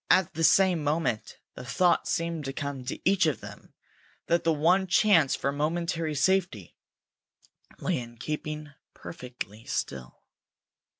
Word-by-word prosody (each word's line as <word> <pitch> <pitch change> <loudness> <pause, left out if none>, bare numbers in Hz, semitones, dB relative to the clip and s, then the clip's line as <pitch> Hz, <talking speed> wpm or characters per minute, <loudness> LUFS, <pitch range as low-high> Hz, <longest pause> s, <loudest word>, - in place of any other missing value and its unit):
At 185 -3 +4
the 165 - -2
same 180 0 +4
moment 145 -7 -1 0.2
the - - -9
thought 175 +8 +2
seemed 165 -3 -2
to 135 - -4
come 140 -2 -4
to 125 - -4
each 190 -3 +4
of 150 - 0
them - - -12 0.5
that 170 0 +1
the 165 - +3
one 175 +5 +3
chance 180 -6 +4
for 140 - -1
momentary 160 +2 -1
safety 165 - 0 1.0
lay - - -1
in 120 -1 -10
keeping 150 +3 -5 0.2
perfectly 125 - -8
still. 65 -2 -5
155 Hz, 135 wpm, -28 LUFS, 135-170 Hz, 1.0 s, At